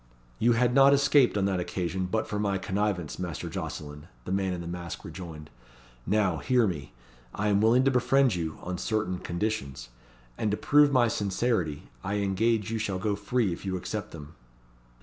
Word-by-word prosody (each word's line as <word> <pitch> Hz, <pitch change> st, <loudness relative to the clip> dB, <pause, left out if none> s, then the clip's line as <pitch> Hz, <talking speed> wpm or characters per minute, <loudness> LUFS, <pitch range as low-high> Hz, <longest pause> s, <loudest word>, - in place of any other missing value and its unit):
"You 120 Hz, +2 st, +4 dB
had 120 Hz, +1 st, +2 dB
not 135 Hz, +1 st, +7 dB
escaped 140 Hz, -4 st, +4 dB
on 100 Hz, -, +1 dB
that 95 Hz, -2 st, 0 dB
occasion, 90 Hz, +1 st, -2 dB
but 110 Hz, +4 st, -1 dB
for 105 Hz, -, -3 dB
my 100 Hz, -2 st, 0 dB
connivance, 95 Hz, -3 st, -2 dB
Master 85 Hz, -6 st, -4 dB
Jocelyn," 75 Hz, +1 st, -6 dB, 0.2 s
the -, -, -5 dB
man 95 Hz, -1 st, 0 dB
in 90 Hz, -1 st, -4 dB
the 85 Hz, -, -7 dB
mask 85 Hz, -1 st, -6 dB
rejoined. 80 Hz, -5 st, -9 dB, 0.6 s
"Now, 100 Hz, -4 st, +2 dB
hear 120 Hz, -, +2 dB
me. 75 Hz, -, -4 dB, 0.4 s
I 105 Hz, +1 st, 0 dB
am 100 Hz, 0 st, +3 dB
willing 115 Hz, +4 st, +4 dB
to 135 Hz, -, +3 dB
befriend 130 Hz, 0 st, +3 dB
you 80 Hz, -3 st, -3 dB
on 90 Hz, 0 st, -4 dB
certain 105 Hz, -3 st, -1 dB
conditions; 85 Hz, -, -3 dB, 0.5 s
and, 110 Hz, -, +1 dB
to 105 Hz, -, 0 dB
prove 145 Hz, -1 st, +4 dB
my 125 Hz, -3 st, +4 dB
sincerity, 100 Hz, -7 st, -1 dB
I 100 Hz, -, -2 dB
engage 105 Hz, +2 st, +1 dB
you 115 Hz, -, -1 dB
shall 100 Hz, -3 st, -2 dB
go 105 Hz, +2 st, -1 dB
free 105 Hz, -1 st, 0 dB
if -, -, -9 dB
you 95 Hz, -1 st, -2 dB
accept 105 Hz, +3 st, -5 dB
them." 75 Hz, -1 st, -10 dB
100 Hz, 185 wpm, -28 LUFS, 90-115 Hz, 0.6 s, not